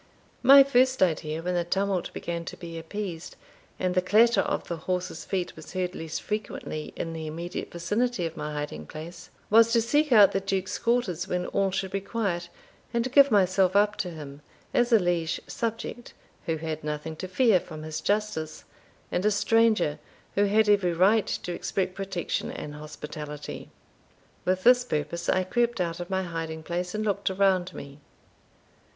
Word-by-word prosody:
My 275 +2 +9
first 260 -3 +3
idea, 160 -2 -1
when 180 +1 -1
the 175 -1 +1
tumult 190 +1 -1
began 170 -1 -4
to - - -7
be 165 -2 -7
appeased, 175 0 -6 0.4
and 185 -1 0
the 185 - +3
clatter 225 +6 +4
of - - -2
the 170 - -3
horses' 180 0 -3
feet 185 -2 -2
was 160 +1 -11
heard 180 -1 -2
less 160 -1 -5
frequently 200 -7 -4
in 165 - -4
the 160 -1 -5
immediate 170 +3 -5
vicinity 205 +4 -1
of 165 0 -4
my 150 - -4
hiding 145 - -5
place, 160 +3 -9 0.2
was 225 +1 +6
to 235 - +5
seek 290 +6 +1
out 205 -4 +8
the 195 - 0
Duke's 190 -1 -2
quarters 235 -8 0
when 180 0 -1
all 195 -1 +1
should 190 0 -3
be 195 0 -2
quiet, 195 -5 -2 0.4
and 235 +1 -1
give 280 +1 +7
myself 190 -2 +3
up 210 +1 +4
to 180 - -2
him, 150 -3 -9 0.3
as 245 0 +2
a 230 - +8
liege 175 -4 0
subject, 230 0 -5 0.3
who 165 -1 0
had 155 -1 -4
nothing 150 +1 -4
to 185 - -5
fear 205 0 +4
from 155 -2 -9
his 155 0 -5
justice, 205 -6 -1 0.5
and 180 - 0
a 210 - +4
stranger, 215 -6 +2 0.3
who 205 - +3
had 215 +2 +3
every 195 -4 +3
right 195 +5 +4
to 175 - -3
expect 185 +1 -2
protection 190 -3 -3
and 150 - -6
hospitality. 150 0 -8 0.8
With 185 0 +1
this 250 0 +6
purpose 155 -4 -3
I 185 - +3
crept 240 +3 0
out 170 -1 -1
of 175 +1 -6
my 190 0 0
hiding 165 -2 -5
place, 180 +3 -3
and 215 0 -1
looked 200 -1 0
around 190 -1 +1
me. 140 +1 -9
185 Hz, 175 wpm, -27 LUFS, 165-210 Hz, 0.8 s, My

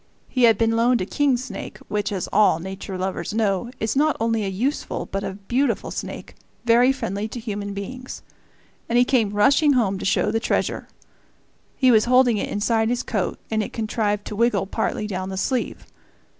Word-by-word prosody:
He 255 -2 +3
had 225 -3 +5
been 225 +1 +2
loaned 240 +1 +3
a 185 - -1
king 275 +4 +1
snake, 240 -5 -7
which, 205 0 -2
as 190 -3 -2
all 205 -5 +5
nature 190 +2 -6
lovers 190 +3 -3
know, 215 0 0
is 220 +2 -1
not 300 +1 +2
only 225 -1 0
a - - -2
useful 245 +10 -2
but 195 0 -4
a - - -3
beautiful 240 +8 -1
snake, - - -6 0.3
very 240 +2 +5
friendly 205 -5 -3
to 240 - -7
human 205 -3 -5
beings; 250 +6 -7 0.7
and 235 - +2
he 245 - +5
came 245 -6 +2
rushing 275 +9 +4
home 200 -7 +1
to - - -6
show - - +2
the 225 - +1
treasure. - - -1 0.9
He 255 -2 +4
was 220 -2 +5
holding 250 -2 +4
it - - -2
inside 220 +2 +1
his 245 0 -1
coat, 205 -6 -2
and 220 0 +1
it 210 - -5
contrived 215 -2 -1
to 210 - -5
wiggle 220 -3 +2
partly 205 - -2
down 185 -2 -4
the 190 - -5
sleeve. 250 +5 -2
220 Hz, 190 wpm, -23 LUFS, 200-245 Hz, 0.9 s, had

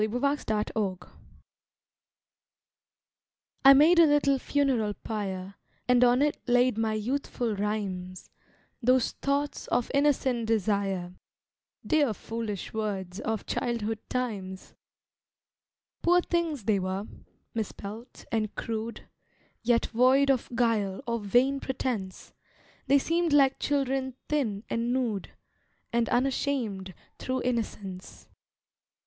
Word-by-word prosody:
OLD 215 - +1
VERSES 215 -8 -1 2.5
I 275 0 +10
made 325 +5 +6
a 330 - +8
little 280 -2 +3
funeral 255 -8 +1
pyre, 195 -3 -5 0.3
And 250 0 +5
on 250 +2 +4
it 295 0 0
laid 245 -1 +3
my 220 0 0
youthful 235 0 -2
rhymes, 195 -3 -4 0.5
Those 255 0 +3
thoughts 285 +1 -2
of 245 -1 0
innocent 265 -5 +2
desire, 200 -4 0 0.7
Dear 290 -8 +2
foolish 220 -3 -5
words 195 -4 -3
of 220 -2 -3
childhood 225 -2 -2
times. 200 -7 -4 1.3
Poor 350 +1 +5
things 335 - -1
they 205 -1 +2
were, 190 +2 -3 0.5
misspelt 220 +1 -6
and 215 -2 -1
crude, 225 0 -5 0.5
Yet 235 0 +2
void 260 +4 +4
of 260 -3 -1
guile 220 -5 +1
or 235 0 -1
vain 245 +7 +2
pretence, 245 -8 -4 0.5
They 280 - +6
seemed 330 +2 +1
like 275 -2 +4
children 270 -2 0
thin 225 -9 -1
and 235 +1 -1
nude, 240 -6 -1 0.6
And 235 -1 +1
unashamed 245 - -1 0.2
through 260 0 -2
innocence. 210 -6 -4
235 Hz, 105 wpm, -28 LUFS, 210-270 Hz, 2.5 s, I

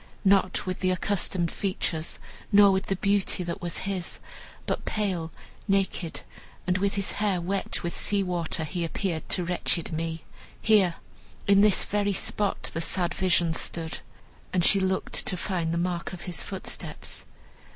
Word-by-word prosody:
Not 195 -1 +3
with 185 -1 -3
the 185 - +2
accustomed 185 -2 +1
features, 170 -4 -1 0.3
not 200 -1 +8
with 190 +1 -1
the 195 - +1
beauty 200 -1 +1
that 170 -1 -4
was 175 -1 -3
his, 190 -3 -2 0.5
but - - -2
pale, 185 -6 -1 0.4
naked, 195 -4 0 0.4
and 180 0 +1
with 200 +1 +1
his 200 0 0
hair 205 -3 0
wet 190 +3 -2
with 170 - -3
sea 200 -1 +1
water, 175 -3 -1
he 170 +3 -3
appeared 165 0 -2
to 180 - +3
wretched 170 -1 -1
me. 165 0 -3 0.4
Here, 200 -6 +4 0.5
in 200 0 +6
this 210 -2 +5
very 205 0 0
spot, 200 +2 0
the 165 - -2
sad 175 +1 0
vision 175 -3 +2
stood," 160 0 -1 0.5
and 180 -2 +2
she 200 - +5
looked 190 0 +1
to 185 - 0
find 170 -3 -1
the 170 - 0
mark 175 +1 -2
of 180 - -7
his 175 -5 -3
footsteps. - - -5
185 Hz, 160 wpm, -27 LUFS, 170-195 Hz, 0.5 s, not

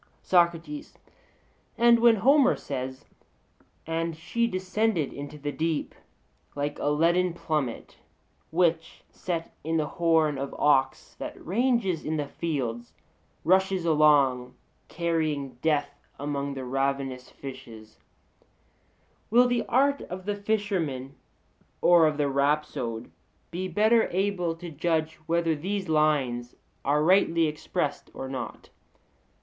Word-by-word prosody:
SOCRATES: 175 - +1 0.8
And 235 0 +6
when 235 -1 +6
Homer 265 +5 +4
says, 130 -1 -6 0.8
'And 165 0 -2
she 235 +8 -1
descended 185 -3 -1
into 145 +1 -8
the 145 0 -4
deep 160 0 -2 0.6
like 145 0 -3
a - - 0
leaden 170 +4 +2
plummet, 150 -8 -3 0.5
which, 165 -1 0
set 170 -2 -4
in 165 +1 0
the 155 - +1
horn 160 -3 +1
of 140 0 -5
ox 135 -2 +2
that - - -7
ranges 215 -3 +1
in 155 +1 -2
the 145 - -1
fields, 125 -7 -4 0.5
rushes 190 0 +2
along 145 -6 +3 0.3
carrying 155 -6 -2
death 145 -2 0
among 140 -1 -3
the 130 -1 -5
ravenous 135 -1 -2
fishes 115 -5 -11
(Il.),' - - -40 1.2
will 245 +3 +5
the 245 -1 0
art 280 +3 +2
of 185 +1 -7
the 205 - 0
fisherman 195 -11 -2 0.7
or 170 -2 +6
of 150 -1 -1
the 145 -1 +1
rhapsode 140 - -1 0.4
be 180 +2 -3
better 220 +5 +3
able 180 -3 -1
to 170 0 -8
judge 160 +1 -1
whether 170 -1 +1
these 190 +5 -3
lines 140 -6 +1 0.3
are 150 +2 +2
rightly 170 -2 +4
expressed 150 -1 -3
or 135 - -5
not? 130 -1 -6
160 Hz, 120 wpm, -27 LUFS, 140-185 Hz, 1.2 s, And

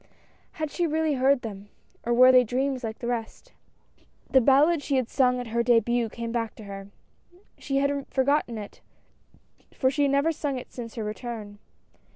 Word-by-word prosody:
Had 310 -2 -4
she 350 -2 0
really 315 0 0
heard 265 0 +2
them, 205 -2 -8 0.3
or 240 - -2
were 255 +2 +7
they 255 -1 +6
dreams 260 +2 -2
like 220 -1 -4
the - - -7
rest. 240 - -5 0.8
The 265 - +6
ballad 285 +6 +4
she 285 - -1
had 255 -3 0
sung 250 -2 +2
at 245 -2 -6
her 235 +1 0
debut 235 0 +2
came 230 +1 -6
back 230 -2 -3
to 220 - -11
her. 195 -1 -8 0.7
She 275 -1 -2
had 280 0 0
forgotten 265 -3 0
it 205 -1 -9 0.9
for 260 -1 +2
she 290 - -1
had 280 -1 +3
never 280 +4 +2
sung 290 -4 -3
it 250 - -9
since 230 -2 -8
her 225 - -4
return. 210 -1 -6
250 Hz, 185 wpm, -26 LUFS, 230-280 Hz, 0.9 s, were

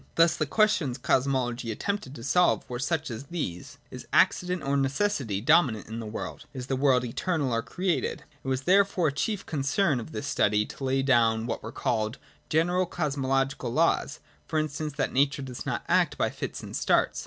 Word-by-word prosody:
Thus 165 0 +5
the 155 - -1
questions 195 - +2
Cosmology 125 -3 0
attempted 175 - -3
to 115 - -9
solve 180 +7 +2
were 120 -1 -5
such 155 0 -1
as 115 +4 -6
these: 135 - -5
Is - - -9
accident 180 -2 +2
or 140 +1 0
necessity 135 - 0
dominant 115 - +3
in 110 +1 -6
the 110 - -6
world? 105 - -6
Is 125 -1 -5
the 135 - -1
world 130 -2 +3
eternal 140 +1 -1
or 115 - +1
created? 180 +6 -2 0.2
It - - -9
was 130 -1 0
therefore 190 -2 +3
a - - -6
chief 195 +7 -2
con 150 -4 -3
cern 140 0 +2
of 120 - -8
this 145 - -5
study 105 -6 +2
to 135 - -10
lay 135 0 +1
down 115 -4 +3
what 120 - -3
were - - -7
called 110 +3 -1 0.3
general 175 +3 +2
Cosmological 135 -6 -1
laws: 155 0 +1 0.3
for 160 - -2
instance, 155 0 -2
that 140 -1 -2
Nature 140 +1 +2
does 125 -2 -7
not - - -2
act - - +2
by - - +1
fits - - -6
and - - -7
starts. - - +2
140 Hz, 190 wpm, -27 LUFS, 125-165 Hz, 0.3 s, Thus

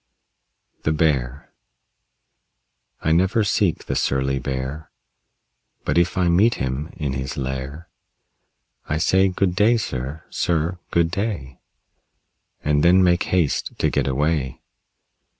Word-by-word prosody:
THE 75 - 0
BEAR 70 -4 0 1.5
I 80 - +1
never 95 +7 +3
seek 100 -3 +1
the - - -2
surly 70 0 0
Bear, 65 +4 -4 1.0
But - - +2
if 85 +2 0
I 90 -2 +2
meet 100 +7 +4
him 65 +4 -3
in 70 -5 -2
his 65 +4 -4
lair 65 +4 -4 1.0
I 75 - 0
say, 95 +4 +3
"Good 90 -1 0
day, 110 +5 +4
sir; 70 - -4
sir, 85 +1 0
good 85 -1 +2
day," 90 - -3 1.0
And 75 0 +2
then 90 +2 +6
make 90 -1 +3
haste 90 -6 0
to - - +1
get 70 -2 0
away. 70 0 -1
80 Hz, 120 wpm, -22 LUFS, 70-90 Hz, 1.5 s, then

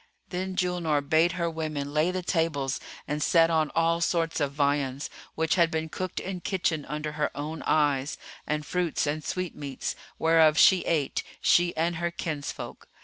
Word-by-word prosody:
Then 185 +1 -3
Julnar 170 -6 0
bade 165 +3 +4
her 170 -1 -1
women 155 -3 -3
lay 155 +3 +3
the 185 0 -2
tables 160 -7 0 0.3
and 150 0 -2
set 165 +1 +4
on 155 -2 +2
all 165 0 +2
sorts 165 -2 +1
of 145 -2 0
viands, 140 -1 0 0.2
which 160 0 +1
had 165 - +5
been 160 -1 -2
cooked 185 +2 -4
in 190 -1 -4
kitchen 170 -6 -1
under 150 +1 -4
her 150 0 -1
own 155 +2 -4
eyes, 145 -2 +2 0.3
and 150 0 -1
fruits 175 0 0
and 150 +1 -2
sweetmeats, 150 -7 -4 0.2
whereof 160 -1 +5
she 190 +3 +7
ate, 150 -5 0 0.2
she 175 -1 +3
and 165 +1 +1
her 170 +1 0
kinsfolk. 155 -4 -5
160 Hz, 165 wpm, -27 LUFS, 150-170 Hz, 0.3 s, she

